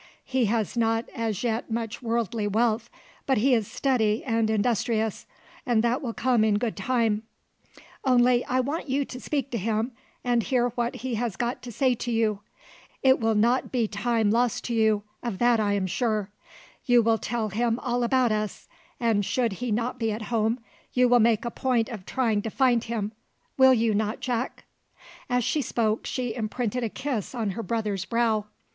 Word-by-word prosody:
He 260 -2 +1
has 220 0 0
not 225 0 +1
as 225 -3 -2
yet 230 0 -1
much 225 -1 -3
worldly 230 -2 -1
wealth, 225 +2 +1 0.4
but 265 - +3
he 255 +5 +3
is 225 -4 +2
steady 225 -5 +1
and 225 -3 +1
industrious, 220 0 0 0.4
and 235 -3 +2
that 240 +4 +1
will 235 -5 -4
come 245 -2 +2
in 215 -2 +3
good 225 0 -2
time; 225 0 +1 0.8
only 250 -1 +4
I 255 +1 +1
want 285 +3 -3
you 275 +2 +1
to 250 - -8
speak 280 -2 -2
to 235 - -1
him, 220 +4 -1 0.3
and 240 -1 +2
hear 245 +1 +1
what 240 0 -2
he 255 0 -4
has 235 -6 -2
got 240 +4 -2
to 245 - -8
say 255 +3 +2
to 240 0 -4
you. 220 -3 +1 0.6
It 265 0 +5
will 225 -1 +1
not 235 +5 +2
be 240 -4 +1
time 220 0 +1
lost 240 0 +1
to 240 - -3
you: 220 -2 +2 0.2
of 235 -6 -3
that 240 0 +3
I 205 -1 +1
am 200 -2 0
sure. 210 +1 -1 0.5
You 245 -2 +5
will 225 0 +2
tell 225 -1 -2
him 230 +3 0
all 245 -1 -1
about 245 0 +2
us, 215 -1 -3 0.3
and 225 -4 +2
should 235 +1 0
he 245 +4 -4
not 235 +3 -1
be 225 -2 0
at 215 +1 -4
home, 225 +2 +1 0.3
you 250 0 +4
will 245 0 +6
make 225 0 +3
a 235 - -2
point 245 -2 0
of 210 -7 -8
trying 225 -5 +1
to 225 - -4
find 245 -1 +2
him, 220 -3 -3 0.4
will 265 -1 +6
you 225 -1 +2
not, 215 +2 -1
Jack?" 250 0 -3 0.7
As 245 -1 +2
she 300 - +1
spoke, 225 -3 -1
she 245 -3 -2
imprinted 235 +1 -2
a 230 - -1
kiss 255 -2 -4
on 220 -4 -1
her 230 - -4
brother's 210 -3 -2
brow. 225 0 +1
230 Hz, 190 wpm, -26 LUFS, 220-245 Hz, 0.8 s, will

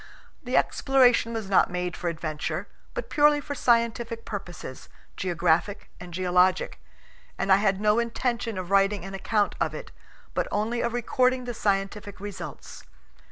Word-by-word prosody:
The - - 0
exploration 255 -4 +3
was 225 -3 -4
not 195 - +4
made 180 -2 -3
for 175 - -4
adventure, 160 +2 -4 0.3
but - - -5
purely 295 0 +5
for 290 0 -5
scientific 235 -2 +1
purposes, 175 -10 -7 0.3
geographic 175 +3 0
and 180 0 -9
geologic, 180 +1 +2 0.6
and 195 - 0
I 190 - +8
had 195 -1 +1
no 210 +2 +3
intention 235 -1 -1
of 185 0 -5
writing 195 -1 +3
an 195 - -7
account 205 +1 0
of - - 0
it, - - -8 0.4
but - - 0
only 220 +3 0
of 235 - -1
recording 255 +1 +1
the 245 - -4
scientific 200 -1 -2
results. 205 -1 -8
205 Hz, 150 wpm, -26 LUFS, 185-235 Hz, 0.6 s, I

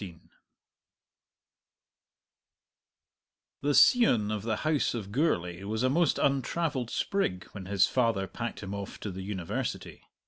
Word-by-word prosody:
The 145 0 +1
scion 120 - +5
of 105 -1 -2
the 110 +1 -1
house 155 -5 +1
of 100 -4 -5
Gourlay 90 - 0
was 110 +4 -2
a 130 - +3
most 165 +1 +2
untravelled 140 -1 0
sprig 90 - -1
when 95 -3 -8
his 95 -1 +4
father 115 -6 +1
packed 115 +2 -6
him 100 0 -5
off 100 -1 -6
to 105 - -4
the 95 +1 -7
University. 100 +5 -4
110 Hz, 125 wpm, -29 LUFS, 100-135 Hz, -, scion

